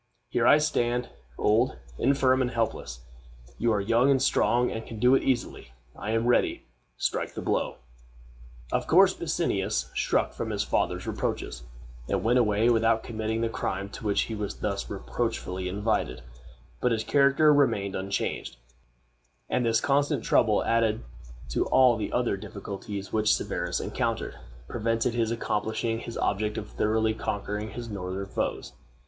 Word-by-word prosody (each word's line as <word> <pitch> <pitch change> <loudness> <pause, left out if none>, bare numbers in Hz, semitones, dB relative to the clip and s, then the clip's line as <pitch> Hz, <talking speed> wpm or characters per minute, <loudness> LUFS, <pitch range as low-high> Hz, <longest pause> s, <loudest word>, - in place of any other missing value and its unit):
Here - - +2
I - - +8
stand, 125 -5 0 0.3
old, 115 +5 +2 0.2
infirm, 130 0 +3
and 125 - +1
helpless. 115 - -3 0.6
You 115 0 +2
are 105 - +2
young 115 +6 +3
and 135 -1 +4
strong, 125 -2 +2
and 115 - -4
can 115 - -9
do 125 +4 +4
it 135 - +4
easily. 120 - -2 0.2
I 105 - -6
am 115 +1 +1
ready. 120 - +2 0.3
Strike - - -2
the - - -4
blow." - - 0 1.0
Of - - 0
course - - +6
Bassianus - - -1
shrunk - - +1
from - - -4
his - - -1
father's - - -1
reproaches, - - -3 0.5
and 95 -2 0
went 120 +3 +4
away 105 -1 +3
without 115 -1 +3
committing 110 0 -2
the 115 - +1
crime 100 -3 -3
to - - -10
which 105 -2 +2
he 115 - -3
was 105 -2 -4
thus 100 -1 -3
reproachfully 95 -3 -3
invited; 100 - -1 0.6
but 125 - +1
his 110 -1 0
character 140 +3 +4
remained 100 -9 +2
unchanged; 95 -9 -3 0.9
and 125 - +2
this 115 -1 +3
constant 145 -1 +1
trouble, 110 -3 +3
added 115 - +1 0.5
to - - 0
all 130 -2 +5
the 110 -2 -3
other 120 -5 0
difficulties 100 0 -7
which 110 -1 +3
Severus - - -2
encountered, - - -2 0.3
prevented 115 - 0
his 115 -2 +1
accomplishing 115 0 -1
his 115 - -7
object 105 +1 0
of 105 - -6
thoroughly 110 +1 +1
conquering 105 0 -3
his 115 +3 -7
northern 95 -2 -4
foes. 95 - -3
115 Hz, 155 wpm, -27 LUFS, 105-120 Hz, 1.0 s, I